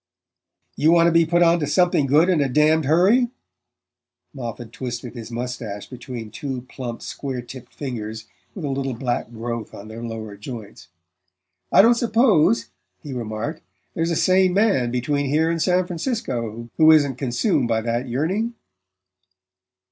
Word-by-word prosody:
"You 155 Hz, +2 st, +3 dB
want 170 Hz, 0 st, +5 dB
to 170 Hz, -, +4 dB
be 165 Hz, -1 st, +4 dB
put 175 Hz, +1 st, +3 dB
onto 165 Hz, -3 st, +3 dB
something 175 Hz, -2 st, +2 dB
good 150 Hz, +6 st, +4 dB
in 175 Hz, -5 st, +3 dB
a 140 Hz, -, +1 dB
damned 150 Hz, +3 st, +3 dB
hurry?" 195 Hz, -, +4 dB, 1.0 s
Moffatt 120 Hz, -3 st, -7 dB
twisted 120 Hz, -1 st, -6 dB
his 115 Hz, -3 st, -8 dB
moustache 120 Hz, -4 st, -5 dB
between 120 Hz, -3 st, -8 dB
two 130 Hz, 0 st, -5 dB
plump 125 Hz, -2 st, -7 dB
square 130 Hz, -3 st, -5 dB
tipped 125 Hz, 0 st, -11 dB
fingers 110 Hz, -5 st, -6 dB, 0.3 s
with 180 Hz, -7 st, -5 dB
a -, -, -2 dB
little 135 Hz, -2 st, -2 dB
black 120 Hz, -2 st, -2 dB
growth 115 Hz, -1 st, -5 dB
on 100 Hz, +2 st, -10 dB
their 110 Hz, +1 st, -8 dB
lower 110 Hz, -3 st, -6 dB
joints. 105 Hz, -4 st, -9 dB, 0.8 s
"I -, -, +7 dB
don't 235 Hz, +2 st, +6 dB
suppose," 225 Hz, -, +3 dB, 0.3 s
he 145 Hz, -, -6 dB
remarked, 120 Hz, +6 st, -4 dB, 0.3 s
"there's 165 Hz, 0 st, -1 dB
a 170 Hz, -, 0 dB
sane 185 Hz, +2 st, +3 dB
man 195 Hz, -, +3 dB
between 140 Hz, +4 st, -1 dB
here 160 Hz, +4 st, +2 dB
and 165 Hz, -1 st, -1 dB
San 180 Hz, +1 st, +2 dB
Francisco 125 Hz, -, -3 dB
who 160 Hz, -1 st, +6 dB
isn't 140 Hz, -5 st, +3 dB
consumed 125 Hz, -2 st, +1 dB
by 115 Hz, -1 st, +1 dB
that 120 Hz, +3 st, -2 dB
yearning." 190 Hz, -, -1 dB
135 Hz, 155 wpm, -22 LUFS, 120-165 Hz, 1.0 s, I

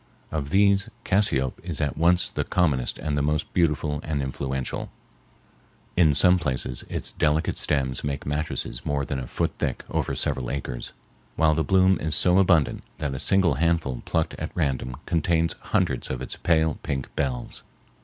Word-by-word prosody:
Of 70 Hz, -3 st, -3 dB
these 100 Hz, +1 st, +3 dB, 0.2 s
cassiope 70 Hz, -10 st, +2 dB
is 85 Hz, -3 st, -1 dB
at 75 Hz, -3 st, -1 dB
once 85 Hz, +3 st, +3 dB
the -, -, -1 dB
commonest 75 Hz, -9 st, +1 dB
and 75 Hz, -1 st, -2 dB
the 70 Hz, -, +1 dB
most 75 Hz, +1 st, -1 dB
beautiful 75 Hz, -3 st, +1 dB
and 75 Hz, -2 st, -2 dB
influential. 65 Hz, -1 st, -3 dB, 1.1 s
In 80 Hz, -5 st, +4 dB
some 90 Hz, +2 st, +5 dB
places 65 Hz, -5 st, -2 dB
its -, -, -3 dB
delicate 75 Hz, +1 st, +1 dB
stems 65 Hz, -4 st, -1 dB
make 70 Hz, -1 st, -3 dB
mattresses 75 Hz, -4 st, -3 dB
more 70 Hz, -1 st, -1 dB
than 65 Hz, +1 st, -3 dB
a 65 Hz, -, -6 dB
foot -, -, -1 dB
thick -, -, -2 dB
over -, -, -1 dB
several 65 Hz, -2 st, -1 dB
acres, 65 Hz, -3 st, -5 dB, 0.4 s
while 80 Hz, -1 st, +4 dB
the 80 Hz, +1 st, +1 dB
bloom 95 Hz, +3 st, +4 dB
is 80 Hz, 0 st, -1 dB
so 90 Hz, +1 st, +4 dB
abundant 85 Hz, -7 st, +3 dB, 0.2 s
that 70 Hz, -3 st, -2 dB
a 65 Hz, -, -4 dB
single 90 Hz, -1 st, +3 dB
handful 80 Hz, -6 st, 0 dB
plucked 80 Hz, -1 st, -1 dB
at -, -, -3 dB
random 65 Hz, -5 st, -1 dB
contains 85 Hz, 0 st, +1 dB
hundreds -, -, 0 dB
of 65 Hz, -, -3 dB
its 65 Hz, -, -4 dB
pale 80 Hz, -2 st, +1 dB
pink 70 Hz, -3 st, -4 dB
bells. 65 Hz, -4 st, -3 dB
75 Hz, 165 wpm, -25 LUFS, 70-85 Hz, 1.1 s, some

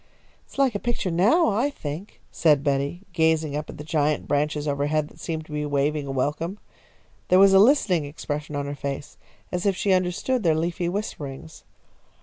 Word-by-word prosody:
"It -, -, -18 dB
is -, -, -14 dB
like 270 Hz, -3 st, +3 dB
a 205 Hz, -, -2 dB
picture 235 Hz, -6 st, -2 dB
now, 220 Hz, -, +4 dB
I 230 Hz, +7 st, +1 dB
think," 165 Hz, -, -7 dB
said 150 Hz, -4 st, +3 dB
Betty, 140 Hz, +4 st, -1 dB
gazing 160 Hz, -2 st, +2 dB
up 150 Hz, 0 st, -4 dB
at -, -, -8 dB
the 150 Hz, -, -7 dB
giant 150 Hz, -1 st, 0 dB
branches 150 Hz, +1 st, 0 dB
overheard 145 Hz, +1 st, 0 dB
that -, -, -19 dB
seemed 160 Hz, -2 st, -4 dB
to 155 Hz, -, -15 dB
be 150 Hz, 0 st, -2 dB
waving 145 Hz, 0 st, 0 dB
a -, -, -3 dB
welcome. 150 Hz, +8 st, -2 dB, 0.7 s
There 185 Hz, -, +5 dB
was 195 Hz, 0 st, +7 dB
a 190 Hz, -, +7 dB
listening 200 Hz, -, +4 dB
expression 150 Hz, 0 st, -5 dB
on 145 Hz, 0 st, -2 dB
her 140 Hz, -, -4 dB
face, 140 Hz, 0 st, -6 dB, 0.3 s
as 180 Hz, +2 st, -1 dB
if 195 Hz, -, +2 dB
she 195 Hz, +1 st, +1 dB
understood 185 Hz, +8 st, 0 dB
their 165 Hz, -5 st, +3 dB
leafy 170 Hz, +2 st, -1 dB
whisperings. 145 Hz, -, -6 dB
155 Hz, 190 wpm, -24 LUFS, 145-190 Hz, 0.7 s, was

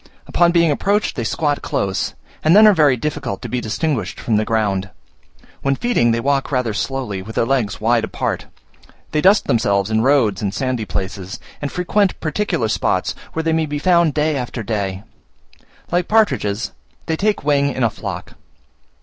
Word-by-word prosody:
Upon 175 Hz, -1 st, +3 dB
being 170 Hz, -2 st, +3 dB
approached 205 Hz, +8 st, 0 dB
they 120 Hz, -, -2 dB
squat 145 Hz, +6 st, 0 dB
close, 95 Hz, -1 st, -2 dB, 0.3 s
and 155 Hz, +4 st, +5 dB
then 215 Hz, +1 st, +8 dB
are 210 Hz, -, +8 dB
very 150 Hz, -7 st, +4 dB
difficult 145 Hz, -7 st, -3 dB
to -, -, -4 dB
be 125 Hz, -, -2 dB
distinguished 130 Hz, +3 st, -2 dB
from 115 Hz, -, 0 dB
the 110 Hz, -, +2 dB
ground. 100 Hz, -4 st, 0 dB, 0.7 s
When 135 Hz, 0 st, +1 dB
feeding 230 Hz, -, +1 dB
they 115 Hz, 0 st, +1 dB
walk 140 Hz, +3 st, 0 dB
rather 125 Hz, -5 st, 0 dB
slowly, 115 Hz, -5 st, -3 dB
with 110 Hz, +4 st, -9 dB
their -, -, +2 dB
legs 120 Hz, -5 st, 0 dB
wide 115 Hz, +1 st, +2 dB
apart. -, -, -3 dB, 0.6 s
They 155 Hz, -, +1 dB
dust 195 Hz, +4 st, +5 dB
themselves 100 Hz, -3 st, +1 dB
in 110 Hz, 0 st, +2 dB
roads 120 Hz, -7 st, +2 dB
and 100 Hz, -1 st, -2 dB
sandy 130 Hz, -3 st, -1 dB
places, 95 Hz, -1 st, -5 dB, 0.2 s
and 145 Hz, -, -3 dB
frequent 190 Hz, +2 st, +1 dB
particular 155 Hz, -, -1 dB
spots, -, -, 0 dB, 0.2 s
where 160 Hz, -, -2 dB
they 160 Hz, 0 st, +1 dB
may 160 Hz, -1 st, +1 dB
be 145 Hz, 0 st, -3 dB
found 170 Hz, -1 st, +3 dB
day 155 Hz, 0 st, +1 dB
after 125 Hz, -3 st, -4 dB
day: 100 Hz, -3 st, -3 dB, 0.9 s
like 175 Hz, 0 st, +1 dB
partridges, 120 Hz, -, +1 dB, 0.3 s
they 160 Hz, -, 0 dB
take 210 Hz, +1 st, 0 dB
wing 140 Hz, -1 st, +2 dB
in 130 Hz, -, -2 dB
a 115 Hz, -, +4 dB
flock. -, -, -6 dB
135 Hz, 175 wpm, -19 LUFS, 110-160 Hz, 0.9 s, then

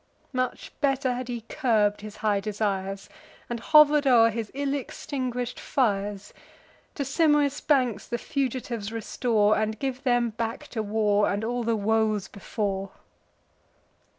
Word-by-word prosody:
Much 255 Hz, -1 st, -2 dB
better 270 Hz, -2 st, +1 dB
had 250 Hz, 0 st, -4 dB
he 240 Hz, -2 st, -4 dB
curb'd 220 Hz, -4 st, +1 dB
his 215 Hz, 0 st, -8 dB
high 205 Hz, -2 st, +3 dB
desires, 195 Hz, -2 st, -2 dB, 0.4 s
And 235 Hz, -, -2 dB
hover'd 300 Hz, 0 st, +6 dB
o'er 230 Hz, -3 st, +6 dB
his 225 Hz, -1 st, -4 dB
ill 280 Hz, 0 st, -1 dB
extinguish'd 250 Hz, -3 st, -4 dB
fires. 205 Hz, -5 st, -1 dB, 0.6 s
To 280 Hz, -, -2 dB
Simois' 290 Hz, 0 st, +2 dB
banks 255 Hz, -8 st, +1 dB
the 235 Hz, -, -2 dB
fugitives 245 Hz, -6 st, -3 dB
restore, 220 Hz, -1 st, +1 dB
And 215 Hz, 0 st, -1 dB
give 265 Hz, +1 st, -3 dB
them 245 Hz, -3 st, +2 dB
back 230 Hz, +1 st, -4 dB
to 225 Hz, -, -3 dB
war, 210 Hz, -1 st, +2 dB
and 200 Hz, +2 st, -1 dB
all 240 Hz, +2 st, -1 dB
the 230 Hz, 0 st, +1 dB
woes 215 Hz, -1 st, +1 dB
before." 195 Hz, -1 st, -3 dB
230 Hz, 135 wpm, -26 LUFS, 210-260 Hz, 0.6 s, hover'd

